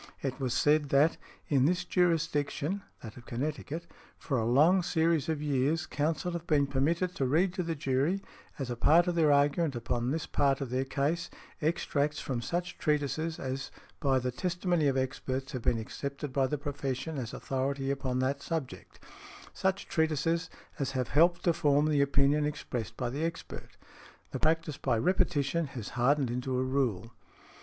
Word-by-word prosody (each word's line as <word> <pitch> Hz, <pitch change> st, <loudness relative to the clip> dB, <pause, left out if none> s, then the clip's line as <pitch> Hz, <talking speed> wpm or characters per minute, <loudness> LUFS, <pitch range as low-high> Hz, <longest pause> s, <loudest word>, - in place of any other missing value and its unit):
It 135 Hz, 0 st, -2 dB
was 130 Hz, -3 st, -1 dB
said 150 Hz, -1 st, +3 dB
that 145 Hz, +4 st, +4 dB, 0.3 s
"in 135 Hz, -3 st, +3 dB
this 180 Hz, +3 st, +1 dB
jurisdiction 165 Hz, 0 st, 0 dB, 0.2 s
(that 110 Hz, -3 st, -9 dB
of 120 Hz, -, -13 dB
Connecticut) 150 Hz, +5 st, -3 dB, 0.3 s
for 135 Hz, -5 st, -1 dB
a 110 Hz, -, 0 dB
long 160 Hz, +9 st, +5 dB
series 165 Hz, -3 st, +1 dB
of 155 Hz, -2 st, -1 dB
years 145 Hz, +3 st, +1 dB
counsel 160 Hz, +4 st, -1 dB
have 170 Hz, 0 st, -5 dB
been 145 Hz, -3 st, +3 dB
permitted 160 Hz, +7 st, 0 dB
to 135 Hz, -9 st, 0 dB
read 175 Hz, +7 st, +2 dB
to 185 Hz, -, -2 dB
the 165 Hz, -2 st, -2 dB
jury, 140 Hz, +6 st, +1 dB, 0.4 s
as 135 Hz, -3 st, -3 dB
a -, -, -2 dB
part 165 Hz, +8 st, +5 dB
of 175 Hz, -, 0 dB
their 160 Hz, -3 st, +4 dB
argument 145 Hz, +1 st, +3 dB
upon 120 Hz, +1 st, -1 dB
this 155 Hz, +3 st, -1 dB
part 140 Hz, -1 st, +1 dB
of 135 Hz, -4 st, -4 dB
their 130 Hz, +1 st, 0 dB
case, 150 Hz, +6 st, -1 dB, 0.3 s
extracts 150 Hz, -1 st, 0 dB
from 125 Hz, -3 st, -3 dB
such 175 Hz, +7 st, -3 dB
treatises 150 Hz, +2 st, 0 dB
as 130 Hz, 0 st, -4 dB, 0.3 s
by 135 Hz, -4 st, +2 dB
the 125 Hz, 0 st, -1 dB
testimony 175 Hz, +1 st, 0 dB
of 135 Hz, -1 st, +1 dB
experts 130 Hz, 0 st, -2 dB
have 130 Hz, -4 st, -4 dB
been 115 Hz, -, +2 dB
accepted 140 Hz, +5 st, -5 dB
by 135 Hz, -1 st, +2 dB
the 150 Hz, -, -2 dB
profession 140 Hz, +1 st, -3 dB
as 120 Hz, -2 st, -4 dB
authority 135 Hz, +1 st, -2 dB
upon 130 Hz, -2 st, -2 dB
that 135 Hz, +2 st, 0 dB
subject, 155 Hz, -6 st, -5 dB, 0.5 s
such 190 Hz, +1 st, -1 dB
treatises 160 Hz, +2 st, 0 dB, 0.3 s
as 135 Hz, -1 st, -1 dB
have 130 Hz, -2 st, -1 dB
helped 170 Hz, +3 st, +4 dB
to 170 Hz, -, +3 dB
form 145 Hz, -1 st, +3 dB
the 150 Hz, -2 st, +3 dB
opinion 140 Hz, +1 st, +3 dB
expressed 125 Hz, -6 st, -4 dB
by 125 Hz, -, -1 dB
the 145 Hz, +5 st, -3 dB
expert. 165 Hz, 0 st, -6 dB, 0.5 s
The -, -, -3 dB
practice 160 Hz, -1 st, +1 dB
by 125 Hz, -4 st, +1 dB
repetition 165 Hz, 0 st, +1 dB
has 110 Hz, -, -5 dB
hardened 130 Hz, +1 st, +2 dB
into 125 Hz, +1 st, -2 dB
a 130 Hz, -, +1 dB
rule". 120 Hz, -5 st, -1 dB
145 Hz, 175 wpm, -30 LUFS, 130-165 Hz, 0.5 s, long